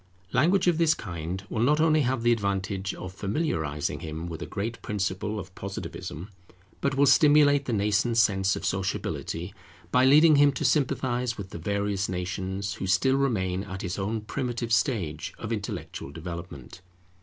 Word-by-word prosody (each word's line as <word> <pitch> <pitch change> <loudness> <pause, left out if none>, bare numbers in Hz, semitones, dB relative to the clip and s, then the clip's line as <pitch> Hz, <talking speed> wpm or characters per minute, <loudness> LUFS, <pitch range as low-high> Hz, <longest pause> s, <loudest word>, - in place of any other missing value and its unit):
Language 175 +9 +3
of 175 -2 +2
this 160 -2 +4
kind 85 0 -5
will 110 - -2
not 150 +6 +3
only 155 -1 +4
have 130 -3 0
the 120 - +4
advantage 100 -2 -1
of 90 0 -7
familiarizing 95 - -2
him 80 +1 -5
with 85 -1 -6
a - - -5
great 110 +3 -4
principle 105 +1 -2
of 95 -1 -9
Positivism, 95 -2 -6 0.5
but 140 -1 0
will 140 +1 +4
stimulate 145 -1 +5
the 125 - -2
nascent 105 +3 +1
sense 95 -3 +3
of - - -5
sociability, 90 -1 -2 0.4
by 125 - +4
leading 150 +3 +7
him 145 0 +5
to 155 - -3
sympathize 125 -3 +1
with 100 -2 -7
the - - -6
various 100 +2 -1
nations 95 +2 -3
who 95 - -5
still 95 +9 +3
remain 95 -9 0
at 95 -2 -7
his 90 +1 -3
own 105 +3 -2
primitive 120 +1 -3
stage 90 - 0
of 115 0 -4
intellectual 100 -8 -5
development. 85 0 -8
100 Hz, 165 wpm, -27 LUFS, 95-130 Hz, 0.5 s, leading